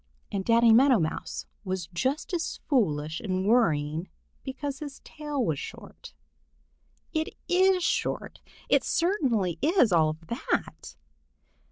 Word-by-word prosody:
And 195 -1 -2
Danny 230 +1 +5
Meadow 260 +2 +6
Mouse 160 -4 -3 0.2
was 185 -3 -3
just 265 - -1
as 340 -2 -2
foolish 160 - 0
in 185 -3 -2
worrying 165 -7 +2 0.3
because 275 +1 -5
his 290 -3 -7
tail 295 -5 -3
is 145 - -3
short. - - -10 1.0
It 315 0 -2
is 370 0 +3
short! - - -1 0.3
It - - +3
certainly 240 - +1
is 320 - +4
all 160 -3 +4
of 155 +1 -7
that! 235 +8 -3
230 Hz, 125 wpm, -27 LUFS, 175-290 Hz, 1.0 s, Meadow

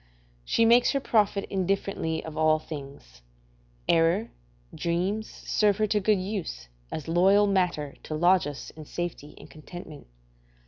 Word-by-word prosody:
She 225 - +2
makes 240 +4 +5
her 275 - +1
profit 210 -5 +1
indifferently 190 -4 -1
of 160 -1 -7
all 155 0 +3
things; 140 - -10 0.7
error, 170 +7 +2 0.4
dreams, 185 +6 -1
serve 205 -2 +1
her 215 - +2
to 210 0 +1
good 210 +1 +3
use, 185 - -5 0.2
as 155 - -5
loyal 190 +5 +4
matter 180 -7 0
to 155 - -5
lodge 175 0 +4
us 145 -1 -7
in 155 -1 -11
safety 170 -3 -5
and - - -12
contentment. 155 - -11
175 Hz, 140 wpm, -27 LUFS, 155-200 Hz, 0.7 s, makes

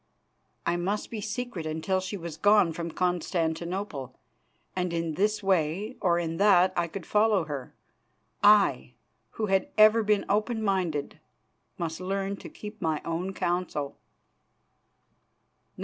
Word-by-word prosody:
I 175 - +1
must 195 +4 -2
be 220 -2 -4
secret 215 -5 -4
until 160 +5 -1
she 190 +2 -4
was 170 -3 -6
gone 205 0 +4
from 170 +1 -4
Constantinople, 170 -3 -2 0.6
and 180 -1 -1
in 165 -1 -1
this 210 +4 0
way 190 +5 0
or 175 -3 +3
in 165 -1 -2
that 190 -2 +5
I 170 -1 +1
could 180 +1 -7
follow 210 -3 +3
her. 140 -6 -6 0.7
I, 205 0 +5 0.4
who 220 - -2
had 195 -2 +1
ever 215 +1 +7
been 210 -1 +1
open 220 +2 0
minded, 180 -8 -1 0.6
must 165 0 -4
learn 195 +1 -2
to - - -10
keep 210 +1 -10
my 160 -3 0
own 170 +3 -2
counsel. 175 -6 -2
185 Hz, 135 wpm, -28 LUFS, 165-205 Hz, 0.7 s, ever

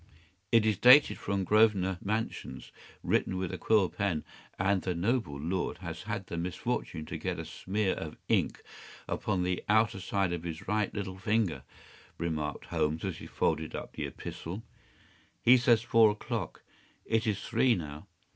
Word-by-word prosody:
’ 90 0 -39
“It 115 -2 +5
is 110 -4 +1
dated 130 +4 +7
from 100 -1 -1
Grosvenor 95 -3 +3
Mansions, 100 - -3 0.3
written 95 - +1
with 95 -2 -3
a - - -3
quill 105 -4 +3
pen, 90 -5 -1 0.3
and 95 0 +2
the 90 0 -2
noble 100 - 0
lord 90 +5 -2
has - - -6
had - - -4
the 85 - -4
misfortune 85 -2 -3
to - - -6
get - - -2
a - - -5
smear 100 0 -1
of 75 -2 -6
ink - - +1 0.4
upon 90 -2 -1
the 90 0 -1
outer 110 -1 +3
side 95 -1 0
of 85 - -3
his 80 -2 -6
right 105 0 +1
little 95 -2 -5
finger,” 105 -4 0 0.6
remarked 80 -3 -3
Holmes, 75 +1 -1
as - - -3
he - - -9
folded 80 -1 -1
up - - -6
the - - -3
epistle. 95 +7 -7 0.8
“He 125 - +7
says 120 -2 +4
four 115 -2 +6
o’clock. 105 -3 -4 0.4
It 115 0 +1
is 105 -3 -1
three 120 +1 +3
now. 75 +1 -7
95 Hz, 165 wpm, -30 LUFS, 85-110 Hz, 0.8 s, dated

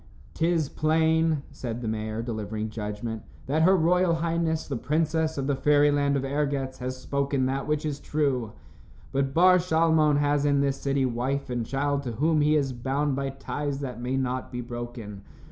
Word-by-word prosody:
"'Tis 165 -2 +1
plain," 160 0 +2
said 120 -4 -5
the 120 - -4
mayor, 110 +1 -3
delivering 110 -2 -4
judgment, 110 +1 -4 0.2
"that 150 +4 +1
her 190 +4 +5
royal 175 +1 +3
highness, 165 -1 -1
the 140 - -3
princess 155 +4 0
of 135 - -1
the 140 0 +1
Fairyland 145 0 +3
of 135 - -2
Ergetz, 140 -2 -2
has 130 0 -4
spoken 140 0 -1
that 135 +1 -2
which 150 0 0
is 145 -2 -2
true. 135 -7 -1 0.6
But 135 0 -1
Bar 180 +2 +6
Shalmon 160 -3 +3
has 145 0 +2
in 145 -1 +3
this 140 -1 -1
city 140 -1 +1
wife 130 +3 -2
and 120 -1 -1
child 140 +3 -1
to 125 -4 -5
whom 155 +6 +2
he 150 +1 +3
is 135 -3 +1
bound 135 +3 -1
by 135 0 -2
ties 140 +1 -4
that 125 -3 -5
may 125 +2 -1
not 130 -1 -2
be 125 - -4
broken. 120 -4 -7
140 Hz, 180 wpm, -26 LUFS, 125-155 Hz, 0.6 s, Bar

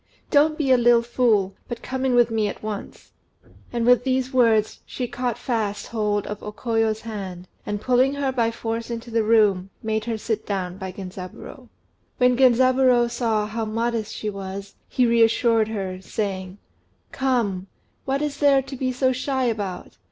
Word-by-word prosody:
Don't 305 +1 +4
be 275 -4 +1
a 255 - +6
little 240 0 +5
fool, 225 -5 +2
but 240 - -6
come 260 +1 -3
in 255 -2 +2
with 240 -1 +4
me 220 -2 +1
at 200 - -7
once." 215 -2 -7 0.6
And 235 -1 -1
with 245 -1 +5
these 260 0 0
words 225 -4 +3
she 250 - -4
caught 245 -1 -3
fast 220 -5 -2
hold 210 -2 -1
of 210 0 -6
O 210 - -6
Koyo's 225 -1 0
hand, 190 -5 -7 0.2
and, 205 0 -2
pulling 255 +4 +2
her 280 -2 0
by 235 -3 +1
force 230 0 -4
into 235 0 -6
the 225 0 +2
room, 210 -4 +3
made 220 -1 -1
her 230 -2 -2
sit 220 0 -3
down 185 -2 -3
by 190 -1 -5
Genzaburô. 185 -1 -9 0.5
When 250 0 +4
Genzaburô 255 -1 +4
saw 225 -3 0
how 220 +2 -3
modest 225 0 -2
she 215 - -5
was, 195 0 -7 0.2
he 250 - +2
reassured 230 -1 +3
her, 190 -4 -4
saying 190 -2 -4 0.5
"Come, 225 -8 0 0.4
what 275 +2 0
is 290 -1 -3
there 280 -2 +4
to 270 +1 -8
be 255 0 -1
so 255 +1 +1
shy 260 +1 -1
about? 205 -7 -3
230 Hz, 175 wpm, -23 LUFS, 210-250 Hz, 0.6 s, a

